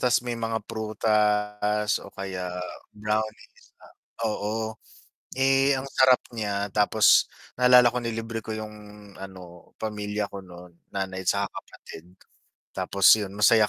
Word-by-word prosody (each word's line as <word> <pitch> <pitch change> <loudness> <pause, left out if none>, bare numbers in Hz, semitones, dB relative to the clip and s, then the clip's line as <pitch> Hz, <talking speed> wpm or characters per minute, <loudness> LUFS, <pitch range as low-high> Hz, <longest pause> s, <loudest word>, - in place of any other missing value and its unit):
tas 125 0 +2
may 120 - -2
mga 115 -2 -3
prutas, 105 -1 0
o - - -11
kaya 95 -2 -5 0.4
brownies 105 +1 -4
na - - -17 0.4
oo, 110 +1 -2 0.7
eh, 135 +1 +4
ang 135 - -6
sarap 130 -2 +5
niya, 100 -2 -2
tapos 105 +1 +4 0.2
naalala 125 0 +7
ko 125 - -4
nilibre 115 -1 -4
ko 110 - -6
yung 110 0 -6 0.4
ano, 90 -3 -11
pamilya 105 -1 -3
ko 100 -1 -9
no'n, 90 -1 -13 0.2
nanay 95 -1 -3
saka - - +1 0.2
kapatid. 85 +3 -13 0.6
Tapos 100 -1 -3
'yon, 100 -2 -5
masaya 105 +1 +5
105 Hz, 125 wpm, -26 LUFS, 100-115 Hz, 0.7 s, naalala